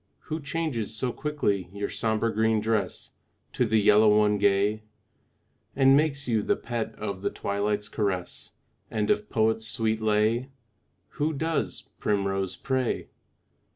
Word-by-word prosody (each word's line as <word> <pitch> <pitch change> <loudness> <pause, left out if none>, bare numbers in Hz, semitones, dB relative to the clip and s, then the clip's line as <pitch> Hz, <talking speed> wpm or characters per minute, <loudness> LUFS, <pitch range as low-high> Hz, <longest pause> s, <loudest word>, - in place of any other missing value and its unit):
Who 160 - -1
changes 140 -8 -3
so 125 +2 -2
quickly 105 -12 -1
your 100 +1 -3
sombre 110 0 -1
green 110 +1 +2
dress 110 -1 -2 0.4
To 125 - +1
the 110 0 +3
yellow 105 0 +5
one 105 -1 +3
gay, 100 +2 +2 0.9
And 135 0 +6
makes 140 -2 +1
you 115 -3 +2
the - - +1
pet 115 -2 -4
of 100 -3 -5
the - - 0
twilight's 105 +1 -2
caress, 100 -5 -3 0.4
And 105 -1 0
of 105 - 0
poet's 110 0 +1
sweet 110 0 0
lay? 110 +4 +1 0.7
Who 155 +2 +1
does, 160 +2 -2 0.2
primrose, 95 -2 0
pray? 130 +4 -1
110 Hz, 135 wpm, -27 LUFS, 105-120 Hz, 0.9 s, And